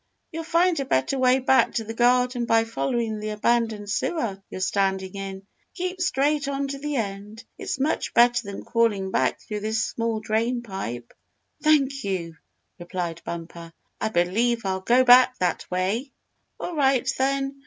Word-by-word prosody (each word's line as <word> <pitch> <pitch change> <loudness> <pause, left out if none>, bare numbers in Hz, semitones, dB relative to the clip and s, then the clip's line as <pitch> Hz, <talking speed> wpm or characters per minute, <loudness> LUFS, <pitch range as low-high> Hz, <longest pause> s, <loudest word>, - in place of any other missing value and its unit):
"You'll 330 0 -5
find 340 +1 +2
a 275 - -1
better 135 - 0
way 255 0 +4
back 260 -2 +3
to 225 - 0
the 225 +1 -6
garden 245 +1 +2
by 225 0 +4
following 225 - -2
the 215 0 -4
abandoned 220 -1 0
sewer 205 - -2
you're - - -7
standing 190 0 0
in. 195 -1 -6 0.3
Keep 365 0 -4
straight 295 -4 +1
on 280 0 -2
to 275 0 -5
the 295 +1 -3
end. 210 -1 -4 0.2
It's - - -4
much 295 +4 -1
better 240 -1 +4
than 200 - -7
crawling 210 -5 +1
back - - +1
through 210 -1 -5
this 220 +1 -1
small 230 -1 -2
drain 230 +3 -1
pipe." 120 - -6 0.5
"Thank 275 -3 +2
you!" 170 -4 -3 0.4
replied 175 -1 -4
Bumper. 170 0 -7 0.3
"I 220 - 0
believe 220 +5 +1
I'll 190 -1 -1
go 245 +6 +4
back 255 0 +7
that 180 -2 -1
way!" 195 +9 -1 0.5
"All 355 - -5
right, 270 -3 +2
then. 275 +1 0
230 Hz, 165 wpm, -24 LUFS, 195-265 Hz, 0.5 s, back